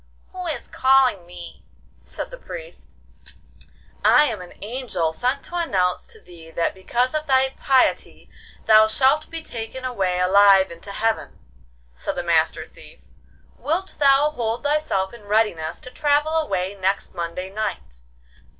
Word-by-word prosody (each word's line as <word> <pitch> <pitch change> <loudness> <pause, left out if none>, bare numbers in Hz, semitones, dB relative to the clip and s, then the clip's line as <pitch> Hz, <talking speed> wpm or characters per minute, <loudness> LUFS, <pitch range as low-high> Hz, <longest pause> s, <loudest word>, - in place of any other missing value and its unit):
'Who 365 -1 -6
is 315 - -4
calling 260 -9 +3
me?' 175 -1 -10 0.4
said - - -6
the - - -8
Priest. - - -10 1.1
'I 300 - +6
am 215 -10 -2
an 180 - -12
angel 210 -8 -2
sent 255 +9 -1
to 350 - -6
announce 185 - 0
to 450 - -12
thee 170 - -14
that 165 +1 -1
because 240 +8 -1
of 310 0 -2
thy 265 -1 +3
piety 265 -2 +1 0.4
thou 215 0 +7
shalt 265 +7 +2
be 330 -1 -6
taken 240 0 -6
away 190 -8 -1
alive 195 0 +5
into 170 +4 -9
heaven,' 220 +2 -2 0.6
said - - -4
the - - -3
Master - - +1
Thief. 60 -1 -18 0.5
'Wilt 335 +8 -2
thou 280 +1 +4
hold 230 -3 -3
thyself 290 -11 0
in 235 -3 -13
readiness 205 -7 0
to 255 - -11
travel 295 +3 +1
away 195 - -1
next 195 0 -2
Monday 175 +2 -5
night? 200 - -5
225 Hz, 145 wpm, -22 LUFS, 185-280 Hz, 1.1 s, thou